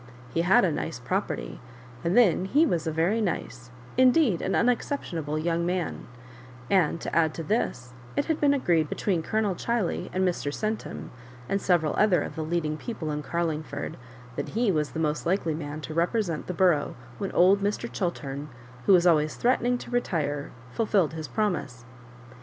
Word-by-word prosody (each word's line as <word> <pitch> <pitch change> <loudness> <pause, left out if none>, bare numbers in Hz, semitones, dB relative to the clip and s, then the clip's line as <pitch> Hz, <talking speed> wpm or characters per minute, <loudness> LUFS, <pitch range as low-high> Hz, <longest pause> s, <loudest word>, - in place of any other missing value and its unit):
He 165 - +2
had 185 +2 +5
a 170 - +1
nice - - -3
property, - - -3 0.4
and 175 +6 +1
then 195 -6 +5
he 290 +11 +4
was 170 - 0
a - - +1
very 170 +8 +1
nice, 125 - -3 0.3
indeed 255 - +4
an - - -1
unex 245 0 +2
ceptionable 160 - -3
young 170 +2 0
man; 175 -1 -2 0.6
and 170 -4 +3
to - - -4
add 160 -2 +3
to 165 - -4
this, 125 - -1 0.2
it 285 - +1
had 320 -2 -1
been 290 -1 +5
agreed 165 - +2
between 185 -5 0
Colonel 215 +3 0
Chiley 225 0 -1
and 185 0 +1
Mr. 145 -6 -1
Centum, 215 +7 -4 0.4
and 195 +8 0
several 165 -5 +2
other 210 -4 +4
of - - -7
the 160 - -3
leading 155 -1 -1
people 160 -4 -5
in 150 0 -2
Carlingford, 155 -3 -3 0.4
that - - -3
he 235 -3 +3
was 150 -4 0
the 160 - -3
most 150 0 -1
likely 170 -3 +1
man 150 0 -5
to 155 - -6
represent 170 0 0
the 180 - -2
borough 175 -6 +2 0.2
when 195 - -3
old 190 +3 +5
Mr. 205 +4 -1
Chiltern, 150 -6 -3 0.4
who - - +7
was 180 -1 +5
always 155 -3 +3
threatening 245 0 +2
to 245 - -10
retire, 150 -11 -1 0.2
fulfilled 200 - +1
his 160 -1 -5
promise. 140 - -2
170 Hz, 175 wpm, -27 LUFS, 155-210 Hz, 0.6 s, who